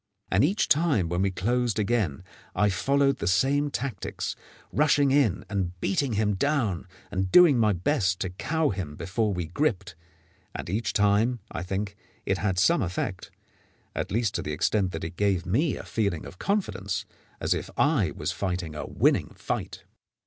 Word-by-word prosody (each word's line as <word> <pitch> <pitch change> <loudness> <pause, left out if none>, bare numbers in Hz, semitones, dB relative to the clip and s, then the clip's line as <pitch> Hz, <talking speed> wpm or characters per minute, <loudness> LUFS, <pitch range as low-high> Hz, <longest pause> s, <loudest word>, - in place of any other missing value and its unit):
And 95 - +4
each 190 +9 +2
time 140 - +2
when 90 +1 0
we 100 - +2
closed 120 +5 0
again 100 - 0 0.3
I 105 0 +3
followed 140 +7 +2
the - - -2
same 135 +10 +2
tactics, 125 -7 -4 0.4
rushing 145 -2 +3
in 140 -5 +2
and 90 -3 -3
beating 120 +8 0
him 105 0 +1
down 105 - 0 0.2
and 95 0 -1
doing 170 -8 +7
my 110 -2 +4
best 95 - +1
to 95 - -2
cow 155 - 0
him 90 -7 -4
before 105 +6 -1
we 90 -3 -2
gripped; 100 - -1 0.6
and - - -5
each 110 +4 -1
time, 105 +4 +3
I 85 - -4
think, 100 +2 -3 0.3
it 95 -1 0
had 100 -3 0
some 95 - +4
effect 95 0 -3 0.6
at - - -3
least 110 0 +1
to - - -1
the 75 - -4
extent 95 +4 +1
that 80 - -5
it 85 +2 -6
gave 95 -3 +1
me 135 - +1
a - - -7
feeling 100 -7 -1
of 95 - -11
confidence, 100 - -1 0.3
as - - +1
if - - -4
I - - +3
was - - -3
fighting 90 -4 -3
a 75 - -5
winning - - +1
fight. - - -4
100 Hz, 170 wpm, -27 LUFS, 90-125 Hz, 0.6 s, doing